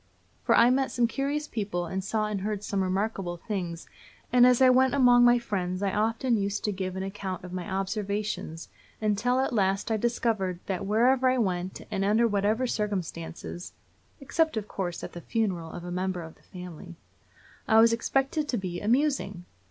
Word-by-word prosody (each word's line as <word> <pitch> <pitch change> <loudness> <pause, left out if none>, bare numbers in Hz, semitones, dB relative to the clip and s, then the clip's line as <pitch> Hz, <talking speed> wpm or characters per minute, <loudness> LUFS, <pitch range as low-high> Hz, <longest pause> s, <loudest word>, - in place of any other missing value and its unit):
For - - +4
I 235 +1 +6
met 265 +1 +1
some 245 - +1
curious 280 +5 -2
people, 200 -8 -3
and 190 +3 -3
saw 215 +2 0
and 210 -2 -3
heard 210 0 -3
some 200 -2 -1
remarkable 190 -1 -1
things; 175 -4 -5 0.5
and 250 0 +7
as 250 -1 +4
I 260 - +7
went 260 +1 +4
among 245 -3 +6
my 240 0 +6
friends 185 -5 -3
I 195 - 0
often 225 +3 +1
used 200 0 -2
to 210 - 0
give 185 -1 -4
an 190 - -3
account 195 -2 -5
of 180 0 -8
my 185 +2 -5
observations, 195 -3 -3 0.3
until 215 +4 +1
at 265 - 0
last 195 0 +1
I 220 - +2
discovered 220 -5 0
that 190 0 -3
wherever 250 +5 +3
I 255 - +2
went, 185 -5 -1
and 195 -2 -1
under 215 +4 +3
whatever 210 +4 +1
circumstances 180 -6 -4 0.5
(except, 315 0 0
of 210 -1 -3
course, 180 -4 -4
at - - -7
the 175 - -7
funeral 185 -6 -1
of 175 - -8
a 175 - -6
member 180 -1 -2
of 160 0 -10
the - - -27
family), 180 -1 -10 0.7
I 220 0 +6
was 230 +1 +6
expected 270 +5 0
to 250 - -1
be 180 -3 -4
amusing! 230 - 0
205 Hz, 185 wpm, -27 LUFS, 185-240 Hz, 0.7 s, and